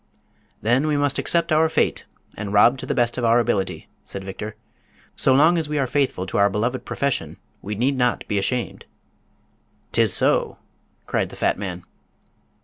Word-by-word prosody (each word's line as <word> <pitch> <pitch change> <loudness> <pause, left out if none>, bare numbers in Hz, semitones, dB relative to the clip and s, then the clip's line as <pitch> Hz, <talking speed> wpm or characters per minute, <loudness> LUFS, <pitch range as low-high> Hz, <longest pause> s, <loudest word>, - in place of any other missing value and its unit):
"Then 125 +7 +2
we 150 -1 +1
must 145 -1 +1
accept 170 -1 +1
our 160 +1 +4
fate - - 0 0.3
and 105 -1 -5
rob 115 +5 +5
to - - -7
the - - -1
best 120 0 +1
of - - -3
our 115 0 +4
ability," 100 -4 -1 0.2
said 100 - -7
Victor. 105 +3 -7 0.6
"So 135 - +2
long 160 +6 +5
as 155 -2 -4
we 150 - -1
are 140 - +1
faithful 130 -8 -1
to 95 - -2
our 100 0 +5
beloved 120 +6 -2
profession 115 - -2 0.2
we 105 +1 -5
need 130 +6 +1
not 125 -1 0
be 105 -2 0
ashamed." 120 +5 -2 1.1
"'Tis - - +2
so!" - - +1 0.5
cried - - -1
the - - -11
fat - - 0
man. 90 -3 -5
120 Hz, 175 wpm, -22 LUFS, 100-140 Hz, 1.1 s, rob